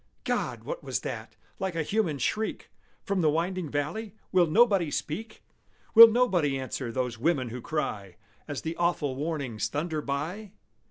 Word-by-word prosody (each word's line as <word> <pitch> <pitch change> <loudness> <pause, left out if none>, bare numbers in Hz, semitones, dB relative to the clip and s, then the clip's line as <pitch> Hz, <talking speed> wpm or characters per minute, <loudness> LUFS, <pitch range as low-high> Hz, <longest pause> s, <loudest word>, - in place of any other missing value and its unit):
God! - - -2
what - - -5
was - - -2
that, - - -6 0.2
like 190 -3 -2
a 165 - 0
human 185 -4 0
shriek 215 - -2 0.3
From 195 -2 0
the 155 - +4
winding 170 +2 -1
valley? 185 +10 -3 0.2
Will 180 -3 +4
nobody 195 -2 +4
speak? 210 +10 -5 0.5
Will 230 +1 +12
nobody 190 - +2
answer 130 -2 -4
those 125 -2 -2
women 130 -3 +1
who 125 +2 -6
cry 105 - -3 0.3
As 145 -3 -5
the 160 +1 -3
awful 170 -6 0
warnings 140 -7 -2
thunder 155 +3 -2
by? 165 +10 -4
160 Hz, 155 wpm, -28 LUFS, 140-190 Hz, 0.5 s, Will